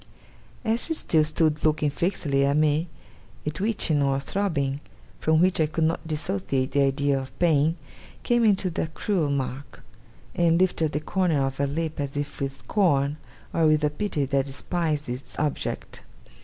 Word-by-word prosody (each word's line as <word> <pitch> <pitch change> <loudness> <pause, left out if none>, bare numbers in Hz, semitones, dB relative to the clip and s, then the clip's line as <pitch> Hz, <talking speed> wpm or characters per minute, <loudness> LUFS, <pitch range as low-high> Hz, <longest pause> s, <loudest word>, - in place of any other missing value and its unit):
As 225 +1 +1
she 325 - -1
still 160 - +2
stood 155 0 +1
looking 150 -1 +2
fixedly 145 -4 0
at 140 +1 +2
me, 155 +2 +2 0.6
a 150 - 0
twitching 165 -4 0
or 135 -1 +2
throbbing, 140 -5 -1 0.4
from 160 0 +3
which 180 -1 +3
I 155 - +3
could 160 +1 -1
not 160 0 0
dissociate 130 - -1
the 140 - +2
idea 140 0 +2
of 130 0 -9
pain, 160 -1 +3 0.5
came 240 -1 +2
into 200 -4 +3
that 160 -1 -3
cruel 180 -8 0
mark; 135 -1 -4 0.5
and 170 -2 +3
lifted 180 -3 +2
up 155 - -1
the 150 - -1
corner 160 -4 +1
of 135 0 -4
her 140 - +1
lip 160 +2 -3
as 140 0 -3
if 145 0 -4
with 135 0 -2
scorn, 145 -8 +1 0.4
or 165 -1 +3
with 155 0 +3
a 150 - +2
pity 150 -3 -1
that 135 0 0
despised 150 +1 -1
its 125 +2 -5
object. 150 -1 -3
150 Hz, 170 wpm, -25 LUFS, 140-170 Hz, 0.6 s, from